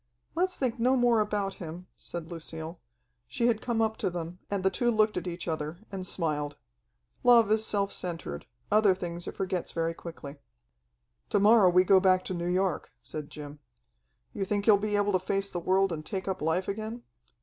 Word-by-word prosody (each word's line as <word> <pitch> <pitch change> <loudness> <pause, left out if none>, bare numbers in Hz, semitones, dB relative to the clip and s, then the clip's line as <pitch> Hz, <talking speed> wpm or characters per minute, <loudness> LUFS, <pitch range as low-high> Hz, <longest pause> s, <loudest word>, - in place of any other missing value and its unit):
"Let's 365 +2 0
think 250 -3 -1
no 255 +3 +4
more 240 -2 +4
about 205 -2 -1
him," 170 +2 -7
said 170 -1 -6
Lucille. 160 0 -6 0.5
She 130 - -1
had 230 -2 +2
come 230 -2 +1
up 220 0 -1
to - - 0
them, 175 0 -6
and 200 -2 -1
the 190 - +3
two 240 - +1
looked 215 -2 +3
at 180 0 -3
each 175 0 -5
other 155 0 -3
and 190 -2 -5
smiled. 150 -5 -2 0.7
Love 235 -3 +6
is 220 0 +3
self 200 -2 0
centred; 165 - -5 0.2
other 210 -3 +5
things 175 -1 -6
it - - -5
forgets 185 -2 -2
very 165 0 0
quickly. 160 -4 -9 0.9
"To - - +3
morrow 210 -1 +6
we 180 +1 +5
go 190 +1 +6
back 185 -1 +3
to - - -3
New 175 0 -2
York," 185 -2 0
said 150 -1 -6
Jim. 150 -1 -9 0.7
"You 200 - -2
think 200 +1 -1
you're 205 -2 +5
able 205 -1 +2
to 185 - +2
face 195 +2 -2
the 175 - -2
world 190 +2 +2
and 155 -2 -4
take 190 +2 -4
up 190 - -2
life 160 +4 0
again?" 220 +4 -4
190 Hz, 195 wpm, -29 LUFS, 170-210 Hz, 0.9 s, Love